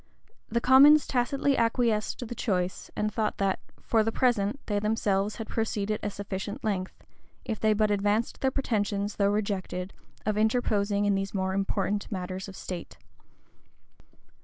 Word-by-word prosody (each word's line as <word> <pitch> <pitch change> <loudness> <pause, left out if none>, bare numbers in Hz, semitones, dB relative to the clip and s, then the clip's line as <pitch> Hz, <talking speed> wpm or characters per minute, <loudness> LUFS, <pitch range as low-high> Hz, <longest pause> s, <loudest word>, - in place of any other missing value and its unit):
The 235 - +1
commons 285 +4 +7
tacitly 275 +2 +1
acquiesced 230 -1 +1
in - - -6
the 240 - -5
choice; 185 -6 -2
and 210 0 -1
thought 215 -2 -1
that, 195 -1 0 0.2
for, 225 - +2
the 225 - 0
present, 235 -1 +1
they 205 -1 0
themselves 210 -1 0
had 225 - -6
proceeded 215 -2 -1
a 210 - -2
sufficient 205 +4 -5
length, 190 -4 -3 0.4
if 220 -4 -3
they 220 -1 +3
but 215 0 +2
advanced 205 +3 0
their 265 - +3
pretensions, 205 -6 -1
though 200 -1 +3
rejected, 200 -3 -2 0.3
of 210 0 0
interposing 210 -3 +1
in 205 - +3
these 195 +1 -2
more 190 0 0
important 195 +1 -1
matters 185 0 -4
of 195 - -9
state. 180 -2 -7
210 Hz, 155 wpm, -28 LUFS, 200-225 Hz, 0.4 s, commons